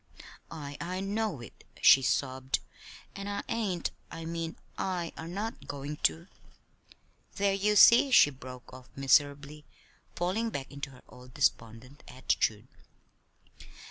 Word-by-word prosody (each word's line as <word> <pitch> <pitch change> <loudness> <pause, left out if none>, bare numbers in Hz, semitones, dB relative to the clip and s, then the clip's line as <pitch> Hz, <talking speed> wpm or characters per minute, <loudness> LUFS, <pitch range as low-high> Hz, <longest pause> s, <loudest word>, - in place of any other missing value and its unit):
"I 145 -3 -8
I 180 +3 -3
know 200 - -2
it," 115 - -13 0.2
she 135 - +7
sobbed; 130 0 0 0.6
"and 200 0 -5
I 200 - -3
ain't 210 -7 -2 0.2
I 165 0 -8
mean, 165 0 -4 0.2
I 175 -3 -3
are 160 - -7
not 205 +6 -5
going 145 +1 -5
to. 165 +3 0 1.1
There, 200 0 +1
you 205 +2 +1
see," 235 +6 +8
she 145 - +6
broke 130 -2 -11
off 130 0 -12
miserably, 145 +1 +1 0.5
falling 195 +7 -1
back 140 -10 -6
into 140 0 -6
her 130 -2 -16
old 125 0 -15
despondent 125 0 -1
attitude. 115 -4 -1
150 Hz, 130 wpm, -30 LUFS, 135-195 Hz, 1.1 s, see